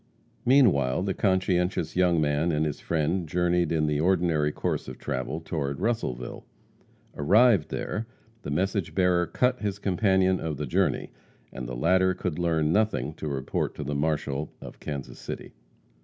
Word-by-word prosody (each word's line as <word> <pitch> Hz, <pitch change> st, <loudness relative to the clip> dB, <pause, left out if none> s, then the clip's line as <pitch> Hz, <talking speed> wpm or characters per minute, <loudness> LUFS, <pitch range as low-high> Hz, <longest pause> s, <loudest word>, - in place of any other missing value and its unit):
Meanwhile, 95 Hz, -, +4 dB
the 95 Hz, -1 st, -1 dB
conscientious 95 Hz, -4 st, 0 dB
young 90 Hz, -2 st, +3 dB
man 75 Hz, +2 st, +1 dB
and 75 Hz, 0 st, +1 dB
his 75 Hz, -, -3 dB
friend 80 Hz, +1 st, -1 dB
journeyed 90 Hz, 0 st, +1 dB
in 80 Hz, -2 st, +2 dB
the 75 Hz, -1 st, 0 dB
ordinary 85 Hz, -3 st, +2 dB
course -, -, -2 dB
of 65 Hz, -, -7 dB
travel 65 Hz, +2 st, -3 dB
toward 75 Hz, -3 st, -3 dB
Russellville. 95 Hz, -, -2 dB, 0.7 s
Arrived 100 Hz, +3 st, +4 dB
there, 110 Hz, +1 st, -3 dB, 0.3 s
the -, -, -6 dB
message 95 Hz, +4 st, -1 dB
bearer 90 Hz, -2 st, +3 dB
cut 125 Hz, 0 st, +1 dB
his 100 Hz, -2 st, -2 dB
companion 95 Hz, -1 st, +2 dB
of 80 Hz, -3 st, -3 dB
the 75 Hz, -, -3 dB
journey, 65 Hz, -, 0 dB, 0.4 s
and -, -, -6 dB
the 60 Hz, -, -4 dB
latter 95 Hz, +7 st, +3 dB
could 90 Hz, -3 st, -3 dB
learn 80 Hz, -2 st, +1 dB
nothing 110 Hz, +2 st, +1 dB
to 80 Hz, -, -6 dB
report 70 Hz, -2 st, -2 dB
to 75 Hz, -, -5 dB
the 70 Hz, +1 st, -3 dB
marshal 75 Hz, -1 st, -1 dB
of -, -, -11 dB
Kansas 70 Hz, -3 st, -6 dB
City. -, -, -7 dB
85 Hz, 155 wpm, -27 LUFS, 75-95 Hz, 0.7 s, Meanwhile